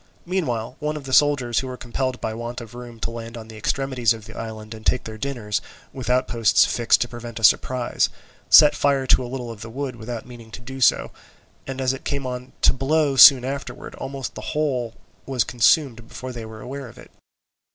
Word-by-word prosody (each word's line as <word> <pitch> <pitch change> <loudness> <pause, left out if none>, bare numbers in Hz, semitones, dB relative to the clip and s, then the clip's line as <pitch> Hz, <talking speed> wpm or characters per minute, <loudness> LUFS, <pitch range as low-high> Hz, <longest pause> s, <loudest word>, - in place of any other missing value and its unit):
Meanwhile, 130 -11 -2
one 150 +1 -2
of 150 - -8
the 135 -1 -6
soldiers 130 -4 +3
who 130 - -4
were 130 0 -6
compelled 125 +1 -3
by 110 - -3
want 120 +2 -5
of 115 -2 -11
room 120 -1 -10
to - - -2
land 115 0 -7
on 110 -1 -10
the 110 - -10
extremities 125 +1 0
of 110 -2 -10
the 115 - -12
island 110 -1 -7
and 110 -1 -11
take 125 - +1
their 110 -1 -8
dinners, 120 -6 -2 0.3
with 130 -2 -6
outposts 120 -3 +3
fixed 120 -1 +2
to 120 - +1
prevent 120 -1 -9
a - - -10
surprise, 125 +4 +3 0.4
set 150 -1 +9
fire 140 -2 +1
to 130 - +4
a 120 - -6
little 125 -2 -5
of 110 -2 -10
the 110 - -7
wood 130 +1 -4
without 115 0 -6
meaning 120 -2 -12
to - - -7
do 130 +2 -9
so; 120 - +3 0.6
and 135 0 -5
as 130 0 +1
it 135 - -8
came 140 -2 -3
on 125 0 -5
to - - +6
blow 140 +1 +1
soon 130 -1 +9
afterwards, 140 +1 -6
almost 135 -2 -5
the 110 - -8 0.2
whole 125 -7 -1 0.3
was 130 -4 +1
consumed 120 0 +2
before 130 +1 -7
they 115 -2 -7
were 110 0 -10
aware 135 +2 -7
of - - -15
it. - - -14
125 Hz, 215 wpm, -23 LUFS, 115-135 Hz, 0.6 s, set